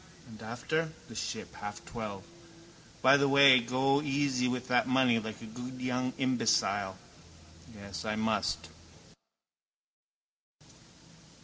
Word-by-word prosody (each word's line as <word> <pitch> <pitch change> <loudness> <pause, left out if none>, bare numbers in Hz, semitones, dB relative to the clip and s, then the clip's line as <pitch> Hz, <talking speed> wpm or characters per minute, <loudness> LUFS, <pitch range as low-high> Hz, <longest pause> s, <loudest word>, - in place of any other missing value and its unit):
And 110 -1 -13
after? 155 +8 -3 0.2
The - - -9
Ship, - - -5
half 105 0 -8
twelve. 105 -6 -7 0.8
By 130 +2 +7
the 140 0 +2
way 140 -2 +8
go 130 +4 +1
easy 135 -3 0
with 125 0 -3
that 125 -1 +3
money 130 -3 +3
like 110 -1 -7
a - - -7
good 125 +3 -8
young 125 0 -1
imbecile. 105 -7 +1 0.8
Yes, 100 -4 -8
I 105 0 -2
must. 85 -8 -1
125 Hz, 115 wpm, -30 LUFS, 110-130 Hz, 0.8 s, way